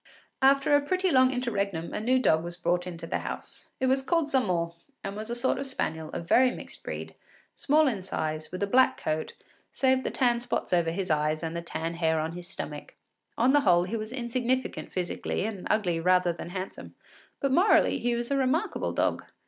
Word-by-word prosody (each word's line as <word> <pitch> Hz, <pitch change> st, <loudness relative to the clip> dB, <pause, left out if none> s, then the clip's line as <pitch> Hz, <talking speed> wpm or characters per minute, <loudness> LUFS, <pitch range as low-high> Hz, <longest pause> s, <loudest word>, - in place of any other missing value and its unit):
After 275 Hz, +2 st, +5 dB
a 290 Hz, -, +4 dB
pretty 370 Hz, +5 st, 0 dB
long 255 Hz, -2 st, +5 dB
interregnum 200 Hz, -9 st, -2 dB
a -, -, -2 dB
new 250 Hz, +4 st, +2 dB
dog 160 Hz, -11 st, +3 dB
was 175 Hz, 0 st, -6 dB
brought 175 Hz, 0 st, 0 dB
into 170 Hz, -2 st, -7 dB
the -, -, -2 dB
house. -, -, -8 dB
It 260 Hz, -, +1 dB
was 265 Hz, +1 st, +2 dB
called 310 Hz, +1 st, 0 dB
Zamore, 180 Hz, -10 st, +1 dB, 0.3 s
and 195 Hz, 0 st, -4 dB
was 215 Hz, +2 st, -6 dB
a 235 Hz, -, -2 dB
sort 240 Hz, +2 st, 0 dB
of 275 Hz, -, -4 dB
spaniel, 160 Hz, -11 st, -3 dB
of 170 Hz, -, -6 dB
very 255 Hz, +6 st, +5 dB
mixed -, -, -8 dB
breed, -, -, -6 dB, 0.4 s
small 305 Hz, +2 st, +3 dB
in 220 Hz, -7 st, -1 dB
size, 155 Hz, -4 st, -4 dB
with 185 Hz, +2 st, -3 dB
a -, -, +3 dB
black 255 Hz, +6 st, +3 dB
coat, 155 Hz, 0 st, -2 dB, 0.4 s
save 260 Hz, -1 st, +2 dB
the -, -, -1 dB
tan 240 Hz, -3 st, +2 dB
spots 240 Hz, -5 st, -3 dB
over 170 Hz, -2 st, +3 dB
his 180 Hz, +1 st, -2 dB
eyes 155 Hz, +1 st, +1 dB
and 165 Hz, 0 st, -3 dB
the 170 Hz, -, -2 dB
tan 165 Hz, 0 st, -3 dB
hair 160 Hz, -1 st, +1 dB
on 160 Hz, +1 st, -2 dB
his 175 Hz, +1 st, -8 dB
stomach. 150 Hz, -6 st, -7 dB, 0.4 s
On 250 Hz, +4 st, +4 dB
the 290 Hz, -, +5 dB
whole 175 Hz, -6 st, +4 dB
he 185 Hz, +5 st, -4 dB
was 215 Hz, 0 st, -4 dB
insignificant 250 Hz, 0 st, -2 dB
physically, 180 Hz, +1 st, -2 dB
and 205 Hz, -4 st, -5 dB
ugly 180 Hz, -6 st, +1 dB
rather 180 Hz, 0 st, +3 dB
than 170 Hz, -, -8 dB
handsome; 185 Hz, +1 st, -7 dB, 0.4 s
but 275 Hz, -, 0 dB
morally, 360 Hz, +10 st, +4 dB
he 240 Hz, 0 st, 0 dB
was 235 Hz, +2 st, -3 dB
a 280 Hz, -, +2 dB
remarkable 270 Hz, +4 st, 0 dB
dog. -, -, 0 dB
200 Hz, 205 wpm, -28 LUFS, 170-260 Hz, 0.4 s, After